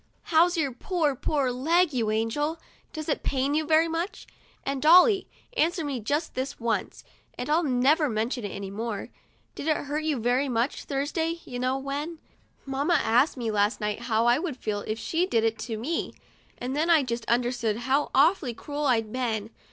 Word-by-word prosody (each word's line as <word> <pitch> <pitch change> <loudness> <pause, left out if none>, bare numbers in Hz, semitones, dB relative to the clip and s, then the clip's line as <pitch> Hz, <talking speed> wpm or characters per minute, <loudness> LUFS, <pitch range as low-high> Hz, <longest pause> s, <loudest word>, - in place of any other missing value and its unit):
"How's 345 +2 +5
your 285 -4 +1
poor, 305 +3 0
poor 275 -1 0
leg, 320 +6 +2
you 230 -4 0
angel? 235 +9 -1 0.3
Does 310 -1 -6
it 295 - 0
pain 275 +1 0
you 310 +1 +1
very 320 +1 +4
much? 330 +4 -3 0.4
And 275 -1 -2
Dolly, 365 +6 +6 0.3
answer 340 -5 +1
me 275 -3 -2
just 290 +9 -2
this 265 +2 -4
once, 230 -1 -2 0.3
and 245 - -4
I'll 320 +3 +4
never 290 +2 +3
mention 230 +2 -2
it 205 - -3
any 195 0 -6
more. 215 0 -4 0.4
Did 315 - -4
I 310 - +1
hurt 295 +2 -3
you 310 -3 0
very 245 +4 +1
much 240 +3 -1
Thursday 320 +4 -2
— - - -23
you 245 -1 -6
know 255 +1 0
when? 285 +5 -4 0.5
Mamma 280 +5 +1
asked 250 +5 +3
me 230 -3 -2
last 205 +1 +1
night 210 -1 -2
how 225 +1 +2
I 240 +3 +4
would 315 -6 -4
feel 210 -4 -2
if 215 - -2
she 330 +10 0
did 230 -12 +1
it 225 -1 0
to 225 0 -4
me, 290 +10 -3 0.4
and 255 +2 -4
then 315 +3 +1
I 320 -4 +5
just 235 -2 -3
understood 240 -2 +1
how 275 +3 +2
awfully 285 -4 +3
cruel 290 +4 -3
I'd 225 -4 +1
been. 225 -4 -2
270 Hz, 190 wpm, -27 LUFS, 235-310 Hz, 0.5 s, Dolly